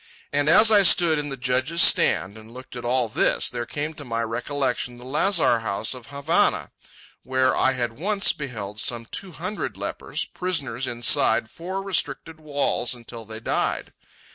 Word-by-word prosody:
And 145 +1 +3
as 215 +6 +7
I 205 -2 +7
stood 170 -4 +5
in 145 0 -3
the 135 - -5
judge's 130 +6 0
stand 95 - +4
and 110 +1 -13
looked 130 +1 -11
at 120 - -7
all 125 0 +1
this, 110 - +1
there 120 -1 -4
came 150 +3 -4
to 150 - -10
my 115 -3 -2
recollection 125 +1 -2
the 125 - -13
lazar 155 - +2
house 110 +1 -2
of 125 -2 -11
Havana, 140 +4 +1 0.5
where 130 0 +1
I 130 - +2
had 120 -1 -4
once 200 +3 +2
beheld 105 -7 -5
some 120 -1 -1
two 185 +9 -6
hundred 185 +7 -5
lepers, - - -4
prisoners 140 -9 -3
inside 115 -1 +2
four 190 +3 -5
restricted 160 -4 -2
walls 145 -5 -1
until 115 -1 -10
they 110 +1 -8
died. - - -2
130 Hz, 165 wpm, -24 LUFS, 120-160 Hz, 0.5 s, as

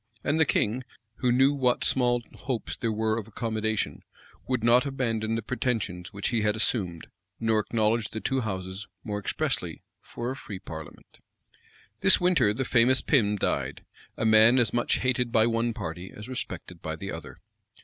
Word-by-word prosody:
[*] 105 - -33
And 150 +3 +1
the 160 - +5
king, 120 +2 +1 0.3
who 125 - +1
knew 135 +3 +4
what 125 -3 +2
small 120 -2 +2
hopes 125 -3 -4
there 115 - -1
were 110 +1 0
of 110 - -8
accommodation, 110 -1 -2 0.5
would 125 -3 0
not 120 +2 +5
abandon 115 -5 -1
the 115 - -3
pretensions 110 -7 -2
which 100 -1 -2
he 115 -2 +1
had 105 0 +2
assumed; 95 -7 0 0.3
nor 115 -1 +2
acknowledge 110 +1 +1
the 110 - -5
two 135 +3 0
houses, 95 -1 -4 0.2
more 105 -3 -3
expressly, 105 - -2 0.2
for 120 +2 -5
a - - -4
free 105 -7 -7
parliament. 80 -5 -10 0.8
This - - +6
winter 165 - +3
the 125 +5 -2
famous 125 +2 +4
Pym 105 -7 +2
died; 100 - -2 0.3
a - - -1
man 110 +3 +6
as 120 -5 +3
much 120 0 +2
hated 125 -2 0
by 110 -1 +4
one 115 0 +1
party 95 -5 -6
as 105 - -10
respected 90 -8 -6
by 80 0 -4
the 95 +4 -6
other. 80 -2 -8
115 Hz, 175 wpm, -27 LUFS, 105-125 Hz, 0.8 s, This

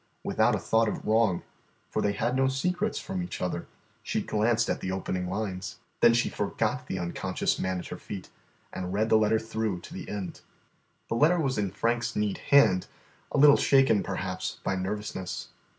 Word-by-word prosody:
Without - - +2
a - - -2
thought 115 0 +2
of 105 - -3
wrong, 110 -5 +2 0.5
for - - 0
they 100 - +1
had 120 +5 0
no 135 0 +3
secrets 180 +10 0
from 190 -1 -3
each 175 - -5
other, 90 -1 -3 0.3
she - - -1
glanced 110 +2 +1
at - - -1
the 95 - -2
opening 90 -1 -2
lines. 95 -2 -4 0.2
Then 115 - +6
she 115 - +2
forgot 115 +5 -2
the 95 - -3
unconscious 85 -1 -1
man 95 0 -1
at 90 - -6
her - - -6
feet 100 -3 -8 0.4
and 90 0 -4
read 110 +2 +1
the 110 - +6
letter 110 +1 +3
through 110 -4 -2
to - - -11
the - - -7
end. 100 -3 -5 0.7
The - - -1
letter 160 +8 +4
was 135 -7 0
in 100 -2 0
Frank's 115 +4 -1
neat 105 -1 0
hand, 115 -10 +4 0.4
a - - -1
little 145 0 +8
shaken, 135 -7 +4
perhaps, - - -3
by 95 - 0
nervousness. 95 0 -4
110 Hz, 185 wpm, -28 LUFS, 95-125 Hz, 0.7 s, little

